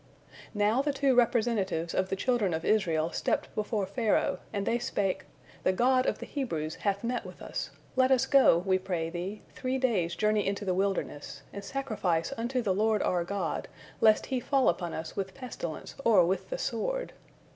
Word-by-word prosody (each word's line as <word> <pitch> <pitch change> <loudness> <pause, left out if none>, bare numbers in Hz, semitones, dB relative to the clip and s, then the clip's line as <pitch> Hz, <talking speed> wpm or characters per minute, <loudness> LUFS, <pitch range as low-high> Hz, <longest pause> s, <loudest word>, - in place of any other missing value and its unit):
Now 210 +5 +3
the 290 0 0
two 275 -1 +2
representatives 220 -8 +1
of 185 0 0
the - - 0
children 205 -4 +1
of 160 - -4
Israel 170 -6 +2
stepped - - -1
before 210 -1 -1
Pharaoh, 210 +3 +1
and 200 -2 -2
they 235 +1 +1
spake, 200 -5 -1 0.4
"The 185 - +2
God 255 +5 +3
of - - +1
the - - -7
Hebrews 165 - -3
hath 200 0 -1
met 245 +1 -1
with - - -11
us; - - -4 0.3
let 260 0 +4
us 265 -1 +4
go, 270 -10 +6
we 185 +2 +1
pray 170 -3 -2
thee, 185 +4 -5
three 260 0 -2
days' 200 -10 +1
journey 215 0 +1
into 200 +1 -2
the 185 - +1
wilderness, 180 -7 -2
and 200 - -6
sacrifice 215 -8 -1
unto 245 +1 -1
the 195 -4 +2
Lord 215 +2 +2
our 175 -1 +1
God, 200 +3 -3 0.3
lest 215 -1 +5
He 260 -2 -1
fall 270 +1 +3
upon 175 -1 -2
us 160 0 -6
with 190 -1 -4
pestilence 220 - -6
or 205 -8 +6
with 190 +3 -1
the - - -2
sword." - - -2
205 Hz, 185 wpm, -29 LUFS, 185-245 Hz, 0.4 s, go